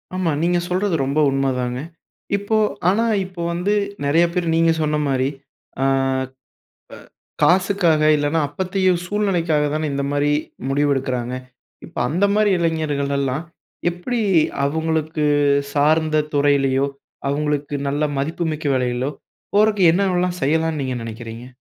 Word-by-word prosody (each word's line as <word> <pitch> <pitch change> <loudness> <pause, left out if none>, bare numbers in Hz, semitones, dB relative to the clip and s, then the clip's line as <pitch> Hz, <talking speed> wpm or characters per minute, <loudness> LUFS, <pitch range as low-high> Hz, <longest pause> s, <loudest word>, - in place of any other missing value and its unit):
ஆமா, 180 -4 0
நீங்க 175 +1 +2
சொல்றது 185 0 0
ரொம்ப 140 +3 0
உண்மதாங்க. 125 -2 -1 0.6
இப்போ 205 +2 0 0.3
ஆனா 225 +4 +2 0.2
இப்போ 185 -2 -8
வந்து 180 +4 0 0.3
நெறைய 165 +4 +4
பேரு 175 -2 -1
நீங்க 165 0 +4
சொன்ன 150 0 +1
மாரி 130 -1 +1 0.5
அ - - +2 1.6
காசுக்காக, 180 -3 +3
இல்லைன்னா 145 +2 0
அப்போதைய 185 +4 0 0.2
சூழ்நிலைக்காக 175 -7 +1
தான 155 0 -1
இந்த 140 0 -1
மாரி 145 0 +1 0.4
முடிவெடுக்கிறாங்க. 135 -3 0 0.5
இப்ப 165 - -15
அந்த 180 +6 +2
மாரி 210 -1 +3
இளைஞர்களெல்லாம், 145 -4 -1 0.5
எப்படி 225 +7 -3 0.4
அவங்களுக்கு 160 0 -1 0.5
சார்ந்த 155 +1 +2
துறையிலயோ, 140 -1 +2 0.4
அவங்களுக்கு 145 0 -1
நல்ல 145 +2 -1
மதிப்புமிக்க 155 +1 -2
வேலையிலோ, 125 +2 -1 0.4
போறதுக்கு 205 -4 +5
என்னவெல்லாம் 180 -1 0
செய்யலான்னு 160 +1 +1
நீங்க 130 -1 -2
நெனைக்கிறீங்க? 115 +1 -8
155 Hz, 110 wpm, -21 LUFS, 140-175 Hz, 1.6 s, போறதுக்கு